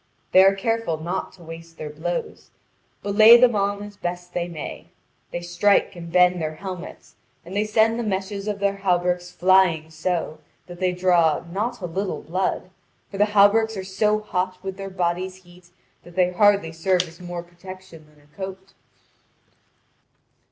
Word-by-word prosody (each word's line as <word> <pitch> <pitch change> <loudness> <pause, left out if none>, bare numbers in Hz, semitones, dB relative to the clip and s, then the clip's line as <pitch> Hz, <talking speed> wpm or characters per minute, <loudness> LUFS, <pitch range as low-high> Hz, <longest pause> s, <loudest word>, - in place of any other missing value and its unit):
They 190 - +7
are 195 +1 +5
careful 225 -4 -1
not 170 +4 -4
to 180 - -16
waste 165 0 -11
their 150 -1 -6
blows, 170 +3 -5 0.5
but 200 - -2
lay 220 +3 +9
them 245 -1 +5
on 200 0 -1
as 205 0 -11
best 175 0 -5
they 175 0 -2
may; 165 -4 -8 0.4
they 175 - -5
strike 175 +3 +2
and 170 -1 -9
bend 180 0 +4
their 155 0 -3
helmets, 185 0 -8 0.3
and 180 +3 -8
they 210 +1 +1
send 220 +2 +2
the - - -1
meshes 200 0 -3
of 210 -1 -2
their 200 0 0
hauberks 180 -2 0
flying 180 -4 +3
so, 160 -1 -3 0.3
that 175 -1 -11
they 185 -1 +1
draw 175 -4 +2
not 215 +5 -3
a - - -3
little 190 +3 -3
blood, 185 +1 -2 0.4
for 200 - -7
the 210 - +4
hauberks 220 +2 +5
are 190 - -4
so 210 +3 +1
hot 185 -3 -2
with 190 -1 -5
their 195 0 -7
body's 185 0 -2
heat 175 0 -19 0.3
that 175 -1 -16
they 180 -1 +2
hardly 200 -3 +3
serve 180 +2 +1
as 170 -1 -13
more 175 -1 -6
protection 175 -2 -13
than 150 -1 -24
a 150 +1 -28
coat. 190 0 -8
185 Hz, 175 wpm, -23 LUFS, 175-200 Hz, 0.5 s, lay